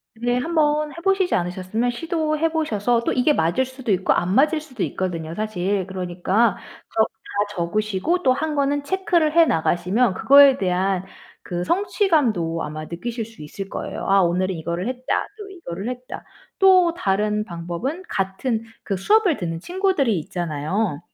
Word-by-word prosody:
네. 245 +2 0
한번 300 0 +1
해 - - -13
보시지 385 -1 +2
않으셨으면 185 +7 -1
시도해 315 +3 -1
보셔서 240 -7 0
또 - - 0
이게 260 +4 +3
맞을 175 - +1
수도 260 -3 -5
있고 190 -1 +2
안 180 +2 0
맞을 305 +7 +3
수도 255 -8 -9
있거든요 170 -3 -3
사실. 200 -3 -1
그러니까 190 +4 0 0.4
저 220 - +4 0.3
다 205 - +3
적으시고 215 - -1
또 255 - +4
한 305 +3 -2
거는 285 0 +1
체크를 340 -2 +1
해 335 0 +6
나가시면 185 - +1
그거에 280 -1 +7
대한 190 -1 0 0.4
그 175 0 -3
성취감도 265 - +1
아마 155 +1 -6
느끼실 225 +8 -5
수 225 -8 -13
있을 195 +6 -7
거예요. - - -5
'아 195 0 +5
오늘은 185 +2 0
이거를 170 +5 -3
했다.' 255 0 -2
또 415 - -8
'이거를 210 - -7
했다.' 250 0 -6 0.3
또 370 -3 +5
다른 210 - 0
방법은 175 - -5
같은 210 +5 -1 0.2
그 195 - -3
수업을 385 - +3
듣는 165 -4 -4
친구들이 350 - 0
있잖아요. 160 +2 -2
220 Hz, 335 characters per minute, -22 LUFS, 180-300 Hz, 0.4 s, 그거에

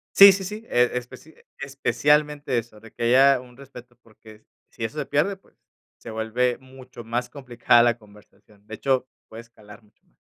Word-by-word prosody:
Sí, 200 0 +10
sí, 190 0 -3
sí, 210 +4 -7
e 120 0 +2
especi 125 +5 -8 0.2
especialmente 145 0 0
eso, 110 -2 -13
de 115 0 -16
que - - -13
haya 135 +3 +4
un 125 -1 -18
respeto 125 -3 -14
porque 110 -1 -18 0.2
si 115 - -9
eso 150 +7 -6
se - - -4
pierde, 190 +7 0
pues - - -30 0.4
se 115 - -11
vuelve 115 +3 -2
mucho 130 -2 -14
más 120 +2 -4
complicada 120 -3 +2
la 120 0 +2
conversación. 105 -1 -22
De 110 - -8
hecho, 130 +1 -1 0.2
puede 110 +1 -11
escalar 110 -2 -17
mucho 105 - -32
más. - - -38
125 Hz, 180 wpm, -23 LUFS, 115-140 Hz, 0.4 s, Sí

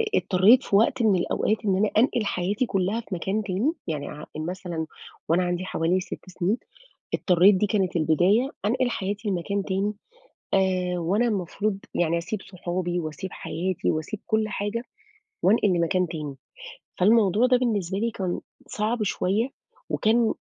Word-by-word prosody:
اضطريت 210 +8 +5
في 200 - 0
وقت 230 +4 +3
من 205 -3 +4
الأوقات 210 +4 +1
إن 190 -2 +2
أنا 210 +1 +2
أنقل 235 -2 +3
حياتي 200 +6 0
كُلّها 195 +2 0
في 200 -4 -6
مكان 195 +5 -1
تاني، 210 - 0
يعني 150 -3 -3
ع 150 0 -8
مثلًا 170 -1 -4 0.4
وأنا 175 +2 +3
عندي 175 +1 -2
حوالي 175 +1 +1
6 185 - -8
سنين، 185 +5 0 0.6
اضطريت 185 +2 +5
دي 205 +3 +2
كانت 190 -4 0
البداية 175 - +3 0.2
أنقل 245 +3 +1
حياتي 205 +2 -3
لمكان 195 +2 -1
تاني، 200 +2 -1 0.6
آآ 185 -2 +1
وأنا 200 +8 +1
المفروض 200 0 -1 0.2
يعني 170 -1 +2
أسيب 180 +4 -4
صحابي 180 -1 -3
وأسيب 155 +3 -5
حياتي 180 +2 -2
وأسيب 160 +7 -3
كُلّ 220 -1 +1
حاجة، 205 +4 -2 0.6
وأنقل 210 0 +4
لمكان 180 0 +1
تاني. 150 -5 -5 0.6
فالموضوع 210 +3 +4
ده 250 0 +4
بالنسبة 200 -7 0
لي 230 +2 0
كان 185 -4 -3 0.3
صعب 215 +2 -1
شوية، 205 +4 0 0.4
وكان 225 +1 +2
190 Hz, 150 wpm, -25 LUFS, 175-215 Hz, 0.6 s, اضطريت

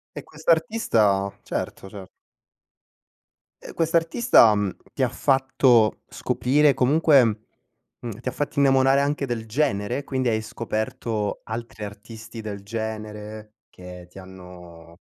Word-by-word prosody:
E - - -7
quest'artista? 155 - +1
Certo, 95 - -5
certo. 95 -2 -10 1.5
E - - -10
quest'artista, 165 - +4
mhmm, 100 -2 -1 0.2
ti - - -2
ha - - +3
fatto 130 -4 +2
scoprire, 145 +3 +2
comunque, 140 +1 +4 0.8
mhmm, 115 -2 -7
ti 125 - -9
ha - - 0
fatto 145 0 -4
innamorare 135 0 +4
anche 140 -1 -1
del 115 -2 -4
genere? 115 0 -1
Quindi 130 -3 -1
hai 110 -1 0
scoperto 110 -1 -4
altri 115 -1 -7
artisti 110 +2 -9
del 100 -2 -7
genere 110 0 -7
che 90 -1 -12
ti 95 - -17
hanno 90 -3 -13
110 Hz, 120 wpm, -23 LUFS, 105-135 Hz, 1.5 s, quest'artista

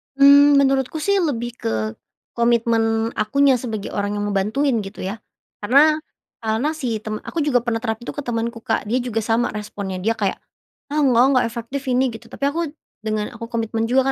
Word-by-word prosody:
Mmm, 285 +1 +7
menurutku 270 +1 +1
sih 400 0 +2
lebih 240 -9 -1
ke, - - -2 0.7
komitmen 230 -1 +2
akunya 270 +4 +3
sebagai 225 -4 -5
orang 205 0 -2
yang 205 0 -2
ngebantuin 220 +7 +1
gitu 195 - -9
ya, 195 +4 -4 0.4
karena 285 +8 +4 0.4
karena 225 +5 -1
si 235 -7 -2
temen 215 0 -4
aku 330 - -2
juga 250 -5 +1
pernah 225 -1 -1
terapin 225 0 -3
itu - - -5
ke 290 - -4
temanku 235 -2 -3
Kak - - -1
dia 240 +5 0
juga 225 -3 -2
sama 230 +2 +1
responnya 200 -3 -5
dia 210 +5 0
kayak, 205 -4 -1 0.6
"Ah 300 - +2
enggak 250 -4 +5
enggak 255 -2 +3
efektif 235 +4 -5
ini," 255 -1 +2
gitu 230 +1 -11
tapi 275 - -3
aku, 295 +4 0 0.4
dengan 215 0 -2
aku 230 -1 -8
komitmen 225 -1 -2
juga 260 +1 +3
235 Hz, 185 wpm, -21 LUFS, 220-265 Hz, 0.7 s, Mmm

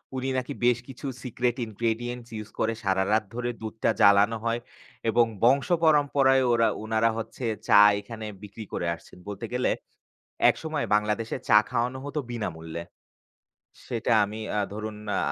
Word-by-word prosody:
উনি 130 +1 -2
নাকি 130 +2 -3
বেশ 120 -1 +4
কিছু 135 +1 -10 0.2
সিক্রেট 125 0 -1
ইনগ্রেডিয়েন্টস 115 +2 -3
ইউজ 105 -1 -6
করে 115 +1 +1
সারারাত 100 +3 +2
ধরে 120 0 -2
দুধটা 110 0 -2
জ্বালানো 100 +2 +5
হয় 115 +1 0 0.5
এবং 120 +1 +4 0.2
বংশ 135 +3 +4 0.2
পরম্পরায় 140 -4 +4
ওরা, 115 -1 +4 0.2
উনারা 110 +1 +2
হচ্ছে, 115 +2 -5 0.2
চা - - +6 0.2
এখানে 110 +1 -8 0.2
বিক্রি 105 +2 -8
করে 85 - -2
আসছেন। 85 - -17
বলতে 100 - -5
গেলে 125 - +1 0.8
একসময় 155 -2 -3
বাংলাদেশে 105 +2 0
চা 105 - +7
খাওয়ানো 125 +3 -1
হত 145 +2 -7
বিনামূল্যে। 85 -7 -5 1.0
সেটা 120 0 -1
আমি 105 +2 -6 0.3
ধরুন 110 0 -5 0.2
আ - - +1
115 Hz, 140 wpm, -26 LUFS, 105-125 Hz, 1.0 s, চা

